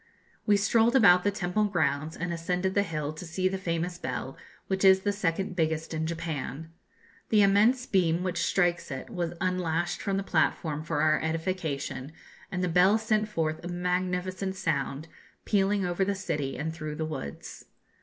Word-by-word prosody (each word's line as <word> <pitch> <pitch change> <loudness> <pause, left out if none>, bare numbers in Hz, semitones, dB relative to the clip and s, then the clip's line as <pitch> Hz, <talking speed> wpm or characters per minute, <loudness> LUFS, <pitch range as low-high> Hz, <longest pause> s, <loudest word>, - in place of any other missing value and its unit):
We 205 -1 +5
strolled 225 +4 +3
about 180 -8 +7
the 205 - +3
temple 200 +1 0
grounds, 155 -5 0
and 175 0 -3
ascended 180 +3 -1
the 200 - +3
hill 155 -5 -3
to 160 - -9
see 180 +2 -1
the 190 0 -2
famous 175 0 -2
bell, 125 +1 -4 0.3
which 190 0 -2
is 190 0 +7
the 205 - +1
second 190 -2 -1
biggest 160 -1 -1
in 160 0 -1
Japan. 160 -2 -4 0.6
The 210 -2 +5
immense 215 +6 +4
beam 175 -4 +2
which 180 -2 -1
strikes 175 -2 +1
it 135 - -6
was 175 -4 -2
unlashed 175 -2 -1
from 195 -1 -1
the 195 - -1
platform 155 -3 0
for 155 -2 -1
our 155 0 +3
edification, 160 -4 -3 0.4
and 180 -1 -2
the - - +2
bell 180 +5 +5
sent 215 -1 0
forth 160 -5 -2
a - - -5
magnificent 180 +1 -2
sound, 150 -3 -2 0.4
pealing 200 -1 +2
over 175 +2 0
the 200 +1 0
city 150 -8 -3
and 160 +2 -3
through 155 -2 -5
the 160 - -2
woods. 110 - -7
175 Hz, 175 wpm, -28 LUFS, 160-195 Hz, 0.6 s, about